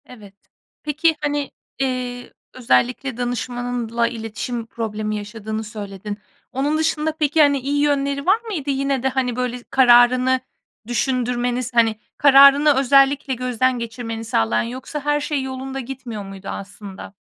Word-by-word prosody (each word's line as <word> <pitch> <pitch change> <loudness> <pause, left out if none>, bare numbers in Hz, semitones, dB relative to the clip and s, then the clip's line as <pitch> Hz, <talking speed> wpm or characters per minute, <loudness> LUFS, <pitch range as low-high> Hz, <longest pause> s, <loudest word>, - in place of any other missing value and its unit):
Evet. 210 -6 -14 0.5
Peki, 310 +2 +1
hani, 290 -1 -2 0.3
eee, 250 -2 -3 0.2
özellikle 250 - 0
danışmanınla 245 -1 -2
iletişim 230 +1 -5
problemi 215 -2 -4
yaşadığını 215 +1 -5
söyledin. 205 -2 -7 0.3
Onun 280 +4 0
dışında, 315 0 0
peki, 300 +1 +3
hani, 285 -2 +4
iyi 285 +2 -1
yönleri 280 -1 0
var 395 +4 +4
mıydı? 365 -12 -5
Yine 275 -1 0
de, 265 - +2
hani, 255 -2 -1
böyle, 250 -1 -3
kararını 255 0 +5 0.5
düşündürmeniz, 245 0 -1
hani, 230 -2 +3 0.2
kararını 280 +1 +7
özellikle 275 +1 +3
gözden 255 0 0
geçirmeni 225 -1 -5
sağlayan, 115 - +1
yoksa 255 +5 -6
her 295 +1 0
şey 290 -2 -2
yolunda 265 0 -5
gitmiyor 245 -4 -6
muydu 195 0 -10
aslında? 200 0 -8
250 Hz, 130 wpm, -21 LUFS, 230-275 Hz, 0.5 s, kararını